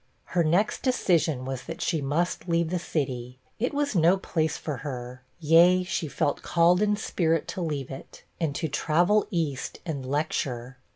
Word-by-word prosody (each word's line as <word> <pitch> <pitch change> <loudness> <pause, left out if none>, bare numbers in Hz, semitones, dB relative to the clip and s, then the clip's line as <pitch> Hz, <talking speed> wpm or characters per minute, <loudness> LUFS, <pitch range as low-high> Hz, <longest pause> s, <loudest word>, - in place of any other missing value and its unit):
Her 175 - +3
next 175 +7 +1
decision 170 - +1
was, 130 -1 -5
that - - -6
she 160 - 0
must 165 +6 -1
leave 170 -1 +1
the 180 - 0
city; 130 -7 -3 0.2
it 245 - 0
was 290 -2 -1
no 175 +2 +5
place 160 -4 -1
for 150 -4 -4
her; 125 -1 -6 0.2
yea, 170 +3 +5
she 175 -3 -2
felt 145 0 -1
called 175 +2 +3
in 210 0 +3
spirit 165 -6 0
to 185 - -4
leave 145 -6 -3
it, 135 - -10 0.2
and 155 -4 -1
to 160 - -1
travel 175 +8 +2
east 155 -7 -2
and 150 -6 -3
lecture. 130 -3 -2
160 Hz, 170 wpm, -27 LUFS, 135-180 Hz, 0.2 s, no